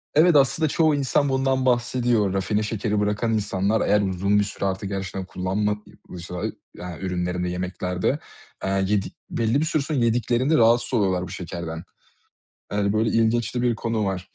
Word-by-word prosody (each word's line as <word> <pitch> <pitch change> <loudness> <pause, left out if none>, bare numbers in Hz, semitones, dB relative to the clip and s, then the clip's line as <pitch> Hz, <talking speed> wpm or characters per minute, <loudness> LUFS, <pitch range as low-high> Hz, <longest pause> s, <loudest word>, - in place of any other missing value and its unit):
Evet, 170 +2 +6
aslında 145 +3 +4
çoğu 155 0 +3
insan 140 0 +1
bundan 130 0 +1
bahsediyor. 120 -4 +2
Rafine 105 +2 0
şekeri 105 -1 -1
bırakan 105 +2 0
insanlar, 105 0 0
eğer 105 0 +4
uzun 100 +1 +1
bir 105 - +3
süre 100 0 -4
artık 95 0 -2
gerçekten 95 -1 -4
kullanmadıysa 95 -2 -4 0.3
yani 90 -1 -8
ürünlerinde, 90 -1 -2
yemeklerde, 90 +6 -2 0.4
eee, - - -1 0.2
yedik 100 -2 -1
belli 115 +4 +1
bir 160 - +1
süre 155 -2 +1
sonra 140 -1 -1
yediklerinde 120 +5 +2
rahatsız 120 +2 +3
oluyorlar 95 -5 +1
bu - - -7
şekerden. 85 -1 -6 0.9
Yani 100 -1 +1
böyle 110 +1 +1
ilginç 115 +1 +1
de 120 - -1
bir 120 -2 +2
konu 115 -1 -1
var. 95 -2 -3
105 Hz, 160 wpm, -24 LUFS, 95-120 Hz, 0.9 s, Evet